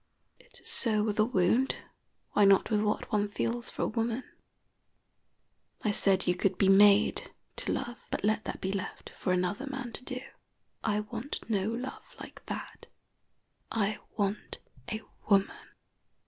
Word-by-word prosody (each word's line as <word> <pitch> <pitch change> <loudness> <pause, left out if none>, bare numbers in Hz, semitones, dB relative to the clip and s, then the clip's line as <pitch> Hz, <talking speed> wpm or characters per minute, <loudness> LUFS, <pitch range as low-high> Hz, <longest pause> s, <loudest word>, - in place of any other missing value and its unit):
It - - -15
is - - -10
so 215 -3 +2
with 215 0 -1
a 215 - +6
wound, 235 +3 +2 0.6
why 210 - +4
not 195 +1 +5
with 210 -1 +3
what 210 0 -1
one 210 -1 +2
feels 230 +3 -2
for - - -3
a - - +2
woman? 230 +3 -1 1.6
I 215 - +2
said 195 -2 +3
you 180 - +3
could 185 +1 0
be 195 - +4
made 200 +1 +6 0.3
to - - -1
love; 240 0 -4
but - - -2
let 215 +1 +1
that - - -4
be 190 - -1
left 195 -1 -5
for 185 - -2
another 185 +8 0
man 265 -4 -5
to - - -8
do. 255 -1 -4 0.6
I 210 -1 +1
want 230 +5 -6
no 205 -2 +1
love 245 +3 -6
like - - -10
that. - - -6 0.8
I 210 -1 0 0.2
want 205 0 -1 0.3
a 215 - -2 0.3
woman. 200 -1 +2
210 Hz, 160 wpm, -30 LUFS, 200-230 Hz, 1.6 s, a